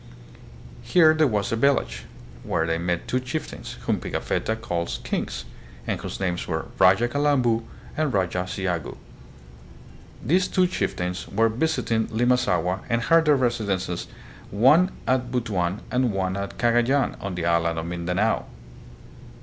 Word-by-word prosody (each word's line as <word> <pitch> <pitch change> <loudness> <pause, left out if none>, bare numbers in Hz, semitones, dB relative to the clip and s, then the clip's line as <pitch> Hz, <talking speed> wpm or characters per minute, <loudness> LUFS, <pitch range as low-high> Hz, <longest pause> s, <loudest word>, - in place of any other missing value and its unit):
Here 155 +7 +5
there 155 -1 +3
was 105 -1 -1
a - - +1
village, 140 +4 +1 0.4
where 80 - -1
they 80 0 -1
met 85 0 -2
two 125 - 0
chieftains, 130 +5 -5
whom - - 0
Pigafetta 110 - -2
calls 90 -7 -3
" - - -20
kings," - - -3 0.4
and - - -2
whose - - -6
names 90 -2 -2
were 80 -2 -2
Raja 95 +5 +5
Calambu 130 -4 +2 0.3
and 155 -2 0
Raja 90 -3 0
Ciagu. 90 -4 -3 1.3
These 180 +4 +3
two 185 - +2
chieftains 90 - -2
were 115 +3 +2
visiting 115 -3 0
Limasaua 110 -7 +1
and 115 - +2
had 165 +5 +4
their 150 -1 +5
residences 105 -9 -1 0.4
one 140 - +5 0.2
at 125 -1 +1
Butuan 105 -6 -1
and 125 -2 +2
one 95 -1 -1
at 100 0 -5
Cagayan 120 +4 +2
on 100 -2 -4
the 85 -1 -2
island 85 -1 +1
of 80 - -3
Mindanao. 90 +5 -1
110 Hz, 140 wpm, -24 LUFS, 90-130 Hz, 1.3 s, Here